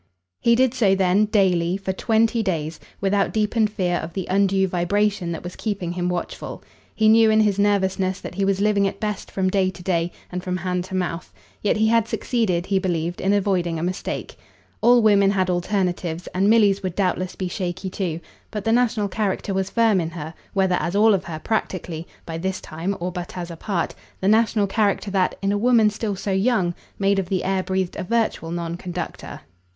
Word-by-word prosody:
He 235 - +4
did 255 0 +3
so 205 -7 +3
then, 190 +2 +3
daily, 185 -4 +2
for 190 -1 -3
twenty 225 +3 +2
days, 165 -6 -2 0.2
without 200 0 +1
deepened 215 0 +1
fear 180 -4 0
of 165 0 -6
the 190 -3 -3
undue 195 0 +3
vibration 185 +1 0
that 165 - -5
was 175 0 -7
keeping 200 -6 -3
him 175 0 -1
watchful. 180 -1 -5 0.3
He 220 - +3
knew 220 0 +6
in 220 0 +4
his 205 -2 +2
nervousness 190 -2 +1
that - - -8
he 195 +2 -1
was 195 0 +1
living 200 -1 +3
at - - -5
best 210 -2 -3
from 190 -1 -1
day 190 -1 +2
to 180 -1 -10
day 175 -2 0 0.2
and 180 0 -4
from 180 -1 -2
hand 180 0 -2
to 190 - -6
mouth; 175 - -3 0.3
yet - - +1
he 220 +1 +3
had 230 -1 +3
succeeded, 195 -11 0
he 195 -1 +1
believed, 175 -2 -2
in 195 - +2
avoiding 185 -4 +1
a 160 - -3
mistake. 180 +1 -4 0.4
All 240 +1 +5
women 200 -2 +5
had 190 -2 +1
alternatives, 180 -2 -1
and 195 +3 +2
Milly's 205 -3 +4
would 185 -3 -4
doubtless 185 -1 -1
be 185 - -3
shaky 185 0 -4
too; 175 -4 -2 0.3
but 210 -2 -5
the 225 - +1
national 235 -3 +2
character 200 -1 -2
was 190 0 -1
firm 225 -5 +3
in 165 - -3
her, 160 -1 -7 0.2
whether 190 -2 +2
as 175 - -2
all 215 +1 +5
of 190 -1 0
her, 160 -2 -5
practically, 170 -3 -3 0.2
by 165 0 -5
this 190 +2 -2
time, 175 +5 -4
or 180 +1 -2
but 180 0 -6
as 175 -1 -5
a - - -6
part; 175 0 -2 0.3
the 190 - -1
national 220 0 +3
character 200 0 0
that, 190 -2 +1
in 195 - +2
a 205 - 0
woman 230 -2 +4
still 205 -1 -3
so 195 +1 -3
young, 190 -2 +2 0.2
made 200 0 +2
of 185 -2 -3
the 190 -2 0
air 190 0 +1
breathed 185 -1 -2
a - - -3
virtual 220 -5 0
non 170 0 -3
conductor. 175 -1 -6
190 Hz, 205 wpm, -23 LUFS, 180-210 Hz, 0.4 s, knew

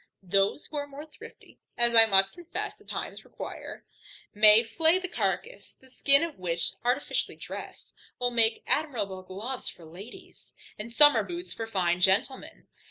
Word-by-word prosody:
Those 195 +7 0
who 300 - -8
are 285 0 -4
more 285 +2 -10
thrifty 310 - -16 0.2
(as 235 0 +4
I 225 -1 +8
must 195 -2 +4
confess 350 -1 -6
the - - -23
times - - -7
require) - - -9 0.5
may 215 +2 +6
flay 320 +10 +1
the 370 0 -4
carcass; 200 - -4
the 260 -1 -21
skin 280 +3 +3
of 330 - -6
which, 170 -2 -1
artificially 250 +4 -1
dressed, - - -10 0.2
will 245 -1 -1
make 225 -1 +2
admirable 215 -11 -2
gloves 210 +8 -6
for 170 - -14
ladies, 185 +9 -14 0.2
and 225 +3 -7
summer 295 +4 +6
boots 350 +1 -7
for 225 - -6
fine 180 -4 -1
gentlemen. 205 +9 0
230 Hz, 160 wpm, -27 LUFS, 195-285 Hz, 0.5 s, I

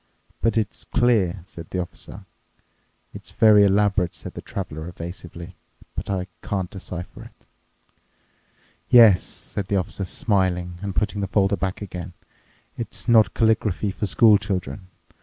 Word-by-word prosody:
"But 115 0 +1
it's 105 -2 -2
clear," 105 -8 +1
said 85 -3 -10
the - - -4
Officer." 90 - -7 0.9
"It's - - -10
very 105 -2 +6
elaborate," 100 -2 +2
said - - -8
the - - -7
Traveler 80 -4 -6
evasively, 85 0 -8 0.4
"but - - -5
I 95 -2 -1 0.2
can't 95 -3 -3
decipher 90 -2 -7
it." - - -18 1.4
"Yes," 115 -7 +8
said 100 -2 -5
the 100 - 0
Officer, 95 +1 -2
smiling 90 -3 0
and 100 -2 -4
putting 105 -1 -1
the 100 - -1
folder 100 0 +2
back 95 +2 -3
again, 90 -2 -7 0.7
"it's 120 - -3
not 115 -3 +5
calligraphy 110 -3 +1
for 100 +2 -3
school 110 -1 +5
children. 95 -4 -4
95 Hz, 140 wpm, -23 LUFS, 90-105 Hz, 1.4 s, Yes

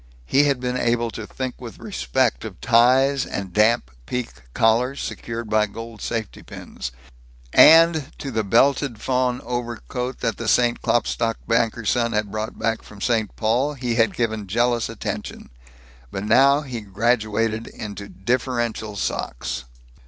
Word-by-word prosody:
He 140 - +4
had 140 -3 +1
been 125 0 -2
able 115 0 +1
to 110 -2 -7
think 130 -1 -5
with 120 -3 -8
respect 130 - -1
of 110 -5 -8
ties 130 +4 +4
and 95 -3 -5
damp 105 - +3 0.2
piqué 125 - -3 0.2
collars 120 +5 +2
secured 115 0 -5
by 105 0 +2
gold 115 +1 -9
safety 115 -3 -4
pins; - - -8 0.6
and 160 -2 +7
to 135 - -5
the 110 -2 0
belted 120 +3 +2
fawn 125 0 0
overcoat 125 +1 -4
that 115 - -1
the 115 - -5
St. 120 +1 +3
Klopstock 115 -1 +1
banker's 115 -1 +1
son 115 -1 +1
had 105 -1 -1
brought 110 +1 -4
back 115 -1 -1
from 105 - -14
St. 110 0 0
Paul, 125 +7 +1
he 125 -3 -2
had 115 -3 +2
given 110 -3 -1
jealous 120 +3 +1
attention. 105 -2 -6 0.6
But 95 - -5
now 135 +7 +5
he 125 -6 -6
graduated 110 +1 0
into 100 -1 -8
differential 120 0 -2
socks. 60 -8 -3
115 Hz, 145 wpm, -22 LUFS, 110-125 Hz, 0.6 s, and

